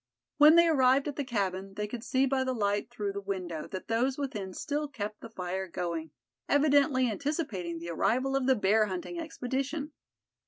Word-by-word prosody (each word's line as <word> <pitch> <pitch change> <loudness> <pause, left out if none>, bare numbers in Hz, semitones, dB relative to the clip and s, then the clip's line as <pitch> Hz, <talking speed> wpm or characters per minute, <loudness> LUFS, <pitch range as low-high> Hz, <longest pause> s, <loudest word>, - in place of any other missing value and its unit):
When 305 +2 +8
they 340 0 +7
arrived 270 -2 +4
at 290 - -3
the 285 - -2
cabin 195 -5 -2
they 210 - -2
could 225 +2 -6
see 260 +1 +2
by 265 0 +1
the 260 -1 -1
light 205 0 0
through 210 -5 -3
the 200 - -4
window 185 -5 -4
that 185 - -7
those 250 +4 +1
within 230 -10 -4
still 295 +10 -3
kept 210 -6 -6
the 230 - -9
fire 190 -2 -4
going, 170 -2 -3 0.4
evidently 285 -2 +4
anticipating 225 - -3
the 170 +1 -6
arrival 255 +10 +1
of 270 -1 +1
the 265 - +5
bear 215 0 +3
hunting 190 - -5
expedition. 285 0 -3
240 Hz, 185 wpm, -30 LUFS, 195-275 Hz, 0.4 s, When